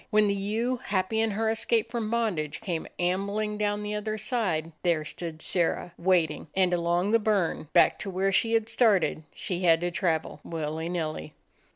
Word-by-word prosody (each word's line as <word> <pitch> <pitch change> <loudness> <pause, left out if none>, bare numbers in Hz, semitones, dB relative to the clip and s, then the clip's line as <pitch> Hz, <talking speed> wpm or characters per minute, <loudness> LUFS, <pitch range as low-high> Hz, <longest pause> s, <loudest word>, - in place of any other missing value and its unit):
When 215 -1 +4
the 200 - +2
ewe, 220 +6 -1
happy 200 0 -1
in 225 - +2
her 220 +2 -1
escape 225 0 0
from 230 -3 -2
bondage, 185 -11 -1
came 175 -6 -3
ambling 200 +4 -1
down 205 0 0
the 210 0 -3
othe?r 215 +1 -2
side, 190 -9 -1
there 165 -4 +1
stood 160 0 -6
Sirrah, 175 0 -1
waiting; 170 -4 +1
and 185 -2 +3
along 175 +3 +1
the 230 - +5
burn, 205 -7 0
back - - +5
to 200 - -4
where 190 +1 0
she 225 +4 +2
had 225 -1 +2
started, 220 -9 +3
she 180 -1 -3
had 165 -2 +5
to 175 0 -1
travel, 165 -3 -1
willy 160 0 -4
nilly. 155 -3 -4
190 Hz, 180 wpm, -27 LUFS, 170-215 Hz, -, the